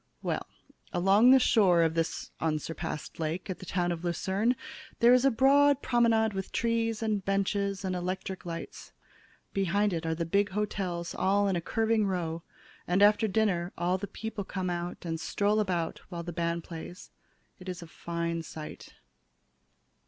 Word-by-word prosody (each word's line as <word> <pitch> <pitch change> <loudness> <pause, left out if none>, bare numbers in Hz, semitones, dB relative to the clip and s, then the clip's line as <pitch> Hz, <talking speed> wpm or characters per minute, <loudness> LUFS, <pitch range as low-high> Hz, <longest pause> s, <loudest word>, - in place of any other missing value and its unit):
"Well, - - -2 0.4
along 195 +7 +5
the 265 - +9
shore 185 -9 +4
of 160 -1 +1
this 165 0 -2
unsurpassed 160 0 -3
lake 165 +4 -2
at 185 - -6
the 185 - -10
town 175 -1 0
of 170 0 -4
Lucerne 190 +7 0 0.4
there 240 +1 +7
is 250 +1 +4
a - - +7
broad 280 +3 +4
promenade 230 -3 +3
with 190 -1 -4
trees 230 -1 0
and 210 -3 0
benches 195 0 0
and 185 -1 -1
electric 185 +1 -4
lights. 165 -1 -7 0.6
Behind 195 +1 +1
it 165 -1 -2
are 160 - 0
the 170 +1 -2
big 200 +5 +2
hotels 185 -4 -3
all 200 +1 +2
in 195 - +1
a 170 - -1
curving 220 +3 +1
row, 170 -3 -2 0.5
and 180 +3 +3
after 210 +1 +5
dinner 190 -4 0
all 180 +2 0
the 200 - -4
people 220 +1 -5
come 185 -1 -3
out 175 +1 -4
and 165 -1 -2
stroll 205 +6 +1
about 175 -5 -1
while 170 -2 -5
the 175 0 -6
band 170 0 -1
plays. 170 +2 -9 0.5
It 185 0 -8
is 180 -1 -5
a - - -11
fine 170 0 -3
sight." 155 -1 -9
185 Hz, 165 wpm, -29 LUFS, 170-210 Hz, 0.6 s, the